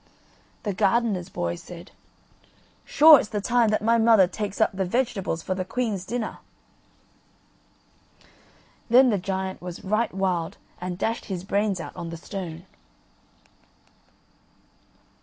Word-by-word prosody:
The 205 - -2
gardener's 205 -2 +1
boy 85 - -3
said: 175 - -11 0.9
"Sure 305 -1 +7
it's 210 - -4
the 210 - -2
time 235 +2 +2
that 215 0 0
my 230 +1 +3
mother 225 -4 +6
takes 205 +1 -5
up - - +3
the 190 0 -1
vegetables 195 -5 -2
for 185 - -2
the 185 0 -3
queen's 205 -2 -3
dinner." 230 +1 -4 2.5
Then 250 +1 +6
the 205 - 0
giant 190 0 -4
was 180 -1 -8
right 215 +4 0
wild 185 -3 -2 0.2
and 180 0 -5
dashed 225 +4 -2
his 185 -3 -5
brains 200 -1 0
out 165 - -8
on 170 - -6
the 165 - -7
stone. 175 -1 -7
195 Hz, 130 wpm, -25 LUFS, 180-225 Hz, 2.5 s, Sure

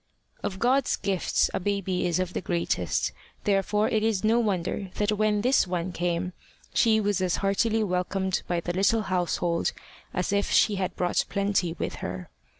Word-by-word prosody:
Of 190 - -3
God's 255 +6 +2
gifts 195 -2 0
a - - 0
baby 190 -2 -1
is 175 - +1
of 185 -1 -2
the - - -2
greatest; 170 -2 0 0.3
therefore 205 +1 +2
it 215 - +1
is 220 -3 +1
no 225 +2 +4
wonder 195 -2 -1
that 210 0 +1
when 210 0 +1
this 250 -3 +3
one 180 0 -2
came, 175 +1 -1 0.4
she 220 -2 +4
was 205 -2 0
as 185 -2 +1
heartily 220 +3 +2
welcomed 190 0 -1
by 175 -1 0
the 175 - -3
little 200 +4 +2
household 175 -2 0 0.4
as 180 +2 -1
if 200 0 +1
she 205 -2 +4
had 185 -1 -2
brought 180 -1 +1
plenty 195 -4 0
with - - -3
her. 90 0 -6
195 Hz, 170 wpm, -27 LUFS, 180-210 Hz, 0.4 s, no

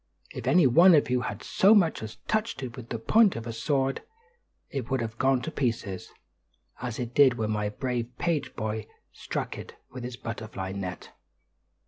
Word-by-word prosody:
If - - -6
any 160 +4 +5
one 170 +8 +7
of 145 -4 +2
you 125 -1 +2
had - - -5
so 200 +4 +5
much 175 -6 +3
as 110 0 -7
touched 215 -9 -1
it 120 -2 -6
with 120 -2 -10
the 115 - -2
point 210 - +4
of 115 - -5
a 115 - -4
sword, 135 +3 0 0.7
it 130 -4 -4
would 135 -1 +1
have 115 -1 -5
gone 130 -1 +2
to 160 - -4
pieces, 115 - -2 0.7
as 125 -3 -4
it 120 -1 -4
did 135 -3 +6
when 110 -2 -1
my 105 -1 -1
brave 125 +1 -3
page 150 -6 -1
boy 110 -1 -3 0.3
struck - - -4
it - - -10 0.2
with 125 -1 -7
his 120 0 -6
butterfly 110 -5 -5
net." 95 -2 -6
125 Hz, 185 wpm, -27 LUFS, 110-140 Hz, 0.7 s, one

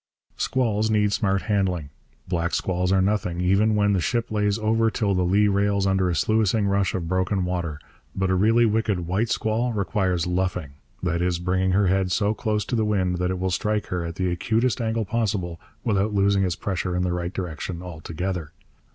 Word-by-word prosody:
Squalls 110 -4 0
need 105 -1 +2
smart 95 -1 +1
handling. 95 -8 -1 0.4
Black 85 -1 -1
squalls 90 0 0
are 95 -1 +3
nothing, 95 -4 0
even 100 +4 +3
when 105 -1 +3
the 95 - +2
ship 115 +8 -1
lays 105 -1 +1
over 115 +1 +2
till 105 -2 0
the 90 - +1
lee 100 +4 +3
rail's 100 0 +1
under 95 -1 +2
a 85 - 0
sluicing 110 +3 +2
rush 100 -1 +1
of 85 -3 -3
broken 95 +1 0
water. 85 -4 -2 0.4
But 95 -1 0
a - - +3
really 115 +5 +4
wicked 110 -4 +1
white 100 +7 0
squall 115 +2 0
requires 95 -3 0
luffing, 90 -4 -1 0.3
that 85 -1 0
is, 90 -1 +1
bringing 95 +1 0
her 100 +1 +3
head 95 0 +1
so 105 +3 +2
close 105 -2 -1
to - - -2
the 110 - +2
wind 95 -4 0
that 90 0 0
it 95 - -1
will 95 +1 -1
strike 105 +3 0
her 90 -1 -2
at 85 0 -5
the 95 -1 -1
acutest 115 +6 0
angle 110 -1 -1
possible 100 -6 -2 0.2
without 105 -2 0
losing 100 0 +3
its 90 -2 0
pressure 90 -3 -2
in 90 - 0
the 90 -1 0
right 90 0 -3
direction 90 -1 -5
altogether. 85 -1 -5
95 Hz, 195 wpm, -24 LUFS, 90-105 Hz, 0.4 s, really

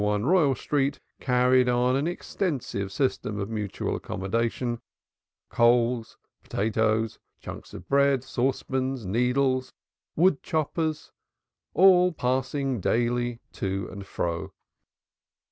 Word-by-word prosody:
1 105 +1 +1
Royal 155 -4 +4
Street 140 +2 -1 0.2
carried 125 0 +3
on 125 +1 +2
an 140 +4 0
extensive 145 - -3
system 105 -3 -1
of 100 +2 -4
mutual 105 -3 -3
accommodation, 115 +4 -2 0.7
coals, 120 0 +2 0.2
potatoes, 110 +1 0 0.2
chunks - - -9
of - - -10
bread, 140 -2 +3
saucepans, 130 -1 -1
needles, 130 +5 +1 0.4
wood 175 -2 +3
choppers, 155 0 -2 0.6
all 180 -1 +6
passing 130 -2 -1
daily 120 +2 0
to 95 -1 -3
and 100 0 -8
fro. 85 -2 -3
125 Hz, 100 wpm, -26 LUFS, 110-140 Hz, 0.7 s, all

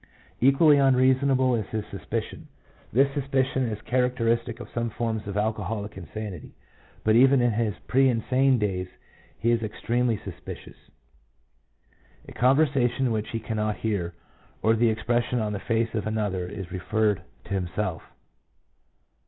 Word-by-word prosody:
Equally 140 +4 +5
unreasonable 130 -1 +3
is 110 -4 -1
his 110 -2 -4
sus - - -8
picion. - - -4 0.5
This 135 +4 +3
suspicion 130 -2 0
is 105 - -4
characteristic 120 -1 0
of 120 - -8
some 120 0 -1
forms 110 -1 -3
of 100 0 -4
alcoholic 105 0 -2
insanity, 95 -1 -7 0.5
but 110 0 +3
even 135 +3 +6
in 120 -1 +3
his 110 -2 -1
pre 135 +1 +4
insane 130 +3 +2
days 95 -4 -1 0.5
he 115 +2 +1
is 115 -1 +2
extremely 115 +2 0
suspicious. 90 -3 -10 1.4
A - - -10
conversation 130 -2 +2
which 110 -1 -2
he 115 - -3
cannot 110 -1 -2
hear, 90 -6 -2 0.5
or 110 - +4
the 115 +1 +3
expression 120 +3 0
on 105 -1 -1
the 100 - -3
face 115 +1 -1
of 110 -1 -2
another, 105 -5 -1
is 90 -1 -7
referred 105 +2 0 0.2
to - - -6
himself. 90 -1 -2
115 Hz, 140 wpm, -26 LUFS, 105-125 Hz, 1.4 s, even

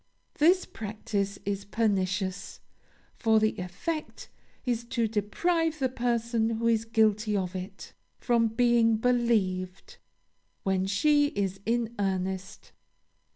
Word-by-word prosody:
This 360 +5 +5
practice 200 -2 -3
is 200 0 -2
pernicious, 195 -3 -1 0.5
for 220 -1 +3
the 215 0 +1
effect 245 - -5 0.4
is 240 -2 -1
to 235 -1 0
deprive 315 - 0
the 265 -3 0
person 235 -2 0
who 230 - -3
is 225 -1 +2
guilty 215 -2 +2
of 185 -1 -3
it, 190 +2 -7 0.2
from 235 -2 +2
being 230 -1 +3
believed, 215 -6 0 0.7
when 190 -1 0
she 290 +8 +3
is 195 - -2
in 235 0 0
earnest. 190 -1 -3
220 Hz, 110 wpm, -28 LUFS, 195-240 Hz, 0.7 s, This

